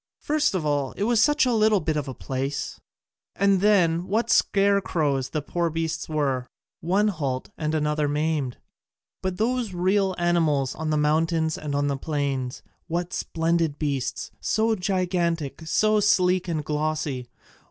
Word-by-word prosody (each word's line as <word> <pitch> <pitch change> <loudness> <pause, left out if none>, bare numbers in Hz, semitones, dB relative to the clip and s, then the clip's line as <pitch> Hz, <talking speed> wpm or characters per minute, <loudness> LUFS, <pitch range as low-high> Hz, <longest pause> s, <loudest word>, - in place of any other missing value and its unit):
First 300 -7 +1
of 170 -4 -1
all, 145 -3 0
it - - -3
was 230 0 +3
such 295 +2 +4
a 250 - +1
little 215 -2 +4
bit 155 -2 -1
of 150 -2 -2
a 130 - -6
place, 135 +1 -4 0.6
and 195 -1 +3
then 180 -4 +3
what 230 +4 0
scarecrows 170 -10 +2
the 150 -1 -3
poor 170 +2 -1
beasts 165 0 -3
were, 135 -5 -1 0.3
one 195 +6 +2
halt, 140 -8 -3
and 155 0 -2
another 150 -1 +1
maimed! 150 -3 -1 0.6
But 185 -1 -2
those 230 -3 -1
real 190 +1 +1
animals 160 -6 +1
on 160 0 -4
the 155 - +1
mountains 160 +1 +1
and 145 -2 -4
the 140 -1 -1
plains 140 -4 -3 0.2
what 175 +1 -2
splendid 165 -2 0
beasts, 140 -4 -2
so 220 +1 +1
gigantic, 180 -6 -1
so 215 +4 +3
sleek 185 -3 +3
and 155 -4 -2
glossy! 150 -4 -2
165 Hz, 150 wpm, -25 LUFS, 150-190 Hz, 0.6 s, such